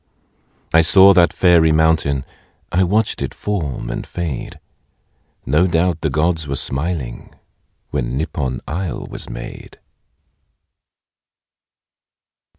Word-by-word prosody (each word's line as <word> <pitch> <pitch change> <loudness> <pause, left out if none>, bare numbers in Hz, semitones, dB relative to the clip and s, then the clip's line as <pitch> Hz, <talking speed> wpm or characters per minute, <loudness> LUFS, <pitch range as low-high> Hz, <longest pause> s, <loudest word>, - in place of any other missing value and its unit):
I 80 - +7
saw 95 +4 +7
that 85 -2 +4
fairy 85 -3 +4
mountain.... 80 -4 +2 0.5
I 90 +2 +2
watched 105 +4 0
it - - -4
form 90 -10 -3
and - - -4
fade. 85 -7 -5 0.9
No 75 +7 +3
doubt 85 -1 0
the 80 - 0
gods 80 +2 0
were 70 - -2
smiling, 70 -2 -3 0.6
When 65 -3 -2
Nippon 70 -4 -3
isle 85 +4 -4
was - - -7
made. - - -9
80 Hz, 105 wpm, -19 LUFS, 70-90 Hz, 0.9 s, I